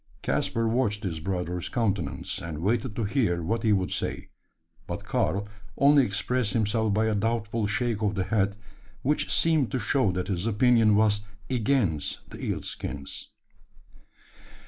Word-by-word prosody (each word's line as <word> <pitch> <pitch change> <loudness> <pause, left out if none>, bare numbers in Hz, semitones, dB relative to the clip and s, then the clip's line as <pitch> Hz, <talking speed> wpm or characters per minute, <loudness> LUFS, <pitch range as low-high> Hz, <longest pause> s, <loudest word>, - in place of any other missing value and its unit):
Caspar 115 0 0
watched 110 -3 0
his 85 -5 -3
brother's 90 0 -3
countenance, 105 -7 -1
and 80 -2 -5
waited 110 +2 0
to 115 - -1
hear 100 -6 +1
what 115 +8 -1
he 110 - +2
would 95 -3 +1
say; - - -3 0.6
but - - -5
Karl 100 +1 0 0.3
only 140 0 +6
expressed 115 +1 0
himself 110 0 +1
by 110 +2 +2
a 110 - +1
doubtful 110 0 0
shake 115 +1 -1
of 105 -1 +1
the 95 - 0
head, 100 +1 +1 0.5
which 150 +3 +1
seemed 160 -6 +3
to 130 - -1
show 115 -1 +2
that 90 +1 -2
his 95 +1 -1
opinion 115 -1 +4
was 105 -1 +3 0.3
against 110 - 0
the - - -8
eel - - -2
skins. 70 -1 -6
105 Hz, 150 wpm, -27 LUFS, 95-115 Hz, 0.6 s, only